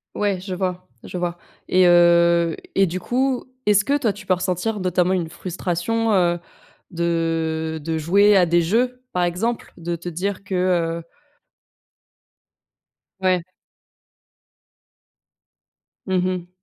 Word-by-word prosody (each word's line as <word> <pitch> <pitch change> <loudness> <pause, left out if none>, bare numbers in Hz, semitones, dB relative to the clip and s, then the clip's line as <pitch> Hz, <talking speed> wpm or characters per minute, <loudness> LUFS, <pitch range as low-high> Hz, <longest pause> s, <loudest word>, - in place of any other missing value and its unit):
Ouais, 200 -3 0
je 185 0 -5
vois, 180 -1 -3 0.2
je - - -6
vois 175 -1 -2 0.3
et 185 0 +4
heu 170 -1 +5 0.2
et 195 0 +4
du 180 +2 -3
coup, 255 +6 -1 0.2
est-ce 210 0 +4
que 285 - +2
toi, 235 -7 +1
tu 200 -1 -11
peux 185 - +3
ressentir, 185 +4 -1
notamment, 180 0 +1
une 175 -3 -1
frustration, 185 +6 -2
heu, 175 -3 +2 0.5
de 165 -2 -1
de 160 0 -2
jouer 200 +6 +4
à 185 - +5
des 170 +1 +3
jeux, 250 +7 0
par 180 - +1
exemple? 195 +7 -2
De 170 0 -3
te 170 +1 -6
dire 190 +4 -3
que 190 -1 -4
heu 170 -2 0 2.2
Ouais. 185 -1 +2 2.7
Mmh 185 -1 +1
mh. 180 -1 -3
180 Hz, 130 wpm, -22 LUFS, 170-195 Hz, 2.7 s, heu